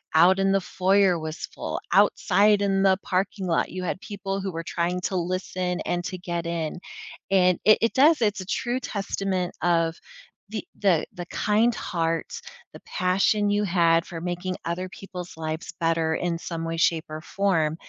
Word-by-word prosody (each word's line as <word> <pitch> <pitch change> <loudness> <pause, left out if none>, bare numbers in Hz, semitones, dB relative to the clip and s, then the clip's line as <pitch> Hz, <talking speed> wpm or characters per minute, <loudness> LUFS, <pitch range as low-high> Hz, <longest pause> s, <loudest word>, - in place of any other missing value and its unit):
out 180 +4 +6
in 195 0 +2
the 195 - +2
foyer 190 -1 +2
was 155 0 -5
full, - - -5
outside 205 0 +4
in 195 -1 +1
the 190 -1 +5
parking 190 +1 -1
lot, 165 - +1
you 185 0 -5
had 180 - -2
people 195 -2 -4
who 190 0 -3
were 165 0 -4
trying 175 +2 -2
to 190 - -2
listen 180 0 -2
and 175 0 -2
to 185 - -4
get 170 -1 -4
in. 170 -1 -3 0.5
And 180 -2 +4
it 215 +1 +7
it 230 - +2
does, 295 0 +5
it's 205 -3 +1
a - - -7
true 240 +6 -1
testament 195 -5 -2
of 165 -2 +2 0.5
the 215 -1 -5
the 185 -6 +3
the 175 - -6
kind 220 +5 +2
heart, 165 -1 -2 0.3
the - - -12
passion 195 +2 +1
you 205 0 +1
had 170 -3 +3
for 165 -3 -7
making 180 +1 -3
other 175 +2 -2
people's 180 -3 -9
lives 160 0 -5
better 165 -1 +1
in 175 -1 -1
some 165 -1 -5
way, 165 0 -3
shape, 165 -1 +2
or 155 - -5
form, 165 -5 0
180 Hz, 180 wpm, -25 LUFS, 170-195 Hz, 0.5 s, it